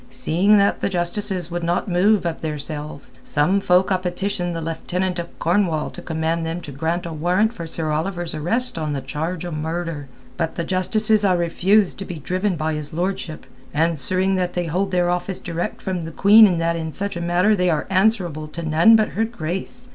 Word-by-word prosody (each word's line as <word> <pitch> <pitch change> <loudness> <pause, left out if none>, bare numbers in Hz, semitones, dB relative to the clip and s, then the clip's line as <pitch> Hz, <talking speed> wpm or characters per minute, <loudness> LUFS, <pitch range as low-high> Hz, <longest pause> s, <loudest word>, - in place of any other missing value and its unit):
Seeing 175 +10 +3
that 200 0 +2
the - - +1
Justices 180 0 -2
would 175 0 -3
not 175 +4 0
move 190 +2 +3
of 165 -1 -3
theirselves, 150 -1 -6
some 155 +7 +2
folk 185 0 +3
ha' 185 -1 +1
petitioned 180 -1 -2
the - - -2
Lieutenant 175 +3 -2
of 170 0 -7
Cornwall 170 -3 +1
to - - -8
command 160 +1 -1
them 165 +2 -3
to 150 - -8
grant 165 +6 -2
a 170 - -5
warrant 180 +8 +1
for 170 -8 -7
Sir 160 -1 -2
Oliver's 175 +2 -2
arrest 175 +7 -1
on 155 -2 -2
a 135 - -3
charge 160 +6 -4
o' 175 - -5
murder. 160 -1 -4 0.3
But 165 -2 -2
the 170 - -2
Justices 215 +4 +1
ha' 190 -3 +3
refused 180 +4 +2
to 195 - -5
be 180 - -6
driven 185 +5 -1
by 155 0 -1
his 150 -1 -5
lordship, 175 -2 -3 0.3
answering 170 +5 +1
that 180 -1 -1
they 175 -1 -1
hold 185 +4 -1
their 180 -1 +1
office 180 +1 -2
direct 170 0 -4
from 185 -2 -2
the 165 0 -6
Queen 210 +6 +7
and 175 -4 0
that 165 0 +1
in 160 -1 -4
such 200 -1 -2
a 170 - -4
matter 180 +5 +3
they 180 -2 +1
are 155 -3 0
answerable 185 -6 +1
to 170 +2 -7
none 165 +8 +5
but 215 -1 +3
her 220 - -1
grace. 220 +4 -5
175 Hz, 205 wpm, -21 LUFS, 160-190 Hz, 0.3 s, Queen